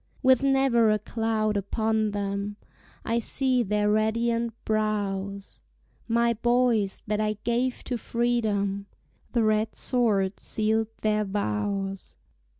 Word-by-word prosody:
With 260 -2 +5
never 270 -4 +3
a 215 - +3
cloud 215 0 -1
upon 220 +2 0
them, 200 0 -3 0.5
I 230 +1 +1
see 255 +2 +1
their 210 -1 +1
radiant 230 +2 +1
brows; 200 -2 -2 0.5
My 235 0 +2
boys 235 -3 +1
that 210 0 -1
I 215 0 +1
gave 245 +2 0
to 245 -2 -3
freedom, 210 -5 0 0.5
The 235 -2 +2
red 215 0 +1
sword 210 -6 +1
sealed 220 0 0
their 215 0 +1
vows! 195 - -3
215 Hz, 115 wpm, -26 LUFS, 205-235 Hz, 0.5 s, With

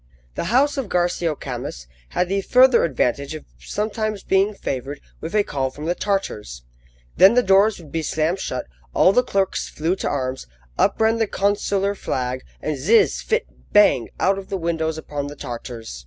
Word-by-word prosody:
The - - -3
house 270 - +2
of 260 -7 -3
Garcio 175 -2 0
Camus - - -6 0.2
had 180 - 0
the 195 +2 0
further 255 +4 +5
advantage 140 0 0
of 155 - -9
sometimes 215 0 -3
being 195 +2 +2
favoured 140 -3 -4 0.2
with 165 +6 -5
a 210 - +4
call 135 -7 -2
from 150 +3 -9
the 170 - +1
Tartars. 105 - -3 0.5
Then 195 +5 +7
the 250 - +4
doors 195 +2 +4
would 160 -5 -13
be 165 - -1
slammed 160 +4 0
shut, 125 -9 -3 0.3
all 185 - +5
the 250 - +5
clerks 195 -6 -1
flew 165 +4 -1
to - - -2
arms, 130 - -3 0.3
up - - +2
ran 225 +1 +3
the 225 - +2
consular 200 0 0
flag, 130 -8 -3 0.2
and 150 -3 -2
zizz! 210 - +3
phit! 455 +2 0 0.3
bang! 205 - +5
out 195 +1 +2
of 195 - -11
the 195 - -2
windows 165 -2 -1
upon 145 -2 -5
the 145 - -8
Tartars. 115 - -7
175 Hz, 180 wpm, -22 LUFS, 140-205 Hz, 0.5 s, Then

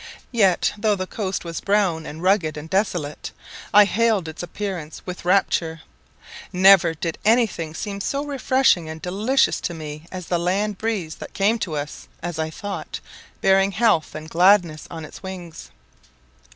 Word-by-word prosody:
Yet 195 -7 +3
though 215 -1 +2
the 185 -1 -3
coast 190 -2 -4
was 165 -1 -5
brown, 195 -6 +1
and 160 +3 -8
rugged, 180 -6 +2
and 150 +1 -7
desolate, 175 -5 -1 0.4
I 210 0 +8
hailed 210 -3 +1
its 160 0 -7
appearance 175 -4 -5
with 180 -1 -7
rapture. 170 -4 +1 0.7
Never 185 -2 +6
did 165 +1 -4
any 230 +3 +5
thing 165 -6 -6
seem 200 +3 -4
so 280 +7 -2
refreshing 260 - +2
and 160 0 -7
delicious 210 +11 +1
to 175 - -3
me 155 0 -8
as 185 -2 -6
the 175 0 0
land 195 +3 -1
breeze 205 -8 -2
that - - -10
came 210 +4 +2
to 170 -7 -3
us, 145 0 -6 0.2
as 175 -2 -4
I 160 0 -1
thought, 200 +5 -6 0.4
bearing 195 +1 +4
health 215 -8 +2
and 155 0 -7
gladness 175 -2 +3
on 160 -2 -7
its - - -12
wings. 185 -4 -8
185 Hz, 165 wpm, -22 LUFS, 160-205 Hz, 0.7 s, I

